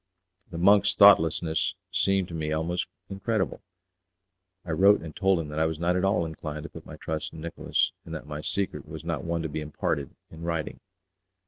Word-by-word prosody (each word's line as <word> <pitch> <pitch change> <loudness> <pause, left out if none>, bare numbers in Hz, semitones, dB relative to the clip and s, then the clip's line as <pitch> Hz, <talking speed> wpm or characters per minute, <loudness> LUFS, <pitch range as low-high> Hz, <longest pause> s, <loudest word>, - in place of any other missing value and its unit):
The 85 - -7
monk's 100 +3 +5
thoughtlessness 80 -3 +5 0.2
seemed 95 -1 +2
to - - -8
me 80 -1 -2
almost 80 +3 -1 0.2
incredible. 100 +1 -2 1.0
I 85 - -4
wrote 100 +6 +5
and 80 -2 -8
told 95 -2 +3
him 80 -2 -4
that 75 +1 -3
I 80 - +3
was 80 -1 -3
not 85 +2 +1
at 90 - 0
all 95 -3 +2
inclined 75 -1 -6
to - - -7
put - - -11
my - - -8
trust 80 -1 -4
in 80 - -9
Nicolas, 85 0 0
and 80 - -7
that 80 - -7
my 75 0 -6
secret 100 +4 -3
was - - -8
one - - -3 0.2
not - - -5
to - - -1
be 75 - -4
imparted 70 -2 -3 0.2
in 80 - -11
writing. 85 -2 -3
85 Hz, 200 wpm, -27 LUFS, 80-95 Hz, 1.0 s, monk's